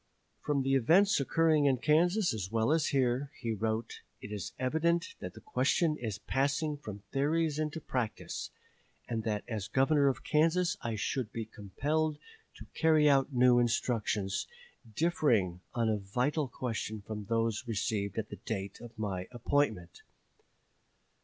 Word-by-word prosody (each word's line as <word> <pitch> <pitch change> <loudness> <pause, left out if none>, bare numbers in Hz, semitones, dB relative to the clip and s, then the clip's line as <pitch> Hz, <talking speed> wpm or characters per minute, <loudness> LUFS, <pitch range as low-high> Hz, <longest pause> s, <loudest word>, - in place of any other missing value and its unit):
"From 145 -2 0
the 135 +1 +1
events 165 - +4
occurring 155 +1 +3
in 135 -2 +3
Kansas 175 - +3
as 100 -3 -4
well 115 +4 +2
as 160 -1 +2
here," 135 0 +1
he 115 -2 -2
wrote, 110 +1 -2 0.2
"it 105 - -9
is 105 -4 -4
evident 165 - 0
that - - -7
the - - -11
question 170 - +1
is 110 -6 -4
passing 140 +6 0
from 105 -8 -9
theories 155 +2 +1
into 155 +1 -2
practice; 125 -7 -3 0.6
and 115 -2 -2
that 105 -2 -1
as 105 -4 -3
governor 140 +5 +3
of 135 - 0
Kansas 165 +4 +2
I 115 -1 -2
should 110 +2 -2
be 115 -1 -4
compelled 145 +9 -2 0.4
to - - -11
carry 155 -2 +4
out 140 0 +4
new 125 -1 +5
instructions, 110 -4 0 0.5
differing 115 - +2
on 115 -2 +1
a 110 -1 +2
vital 125 +9 -1
question 110 -4 -4
from 105 -2 -5
those 115 +1 0
received 105 -3 -2
at 110 - -2
the - - -7
date 100 -3 -5
of 120 -1 -11
my 95 -4 -3
appointment. 120 -8 -1
125 Hz, 150 wpm, -31 LUFS, 110-150 Hz, 0.6 s, new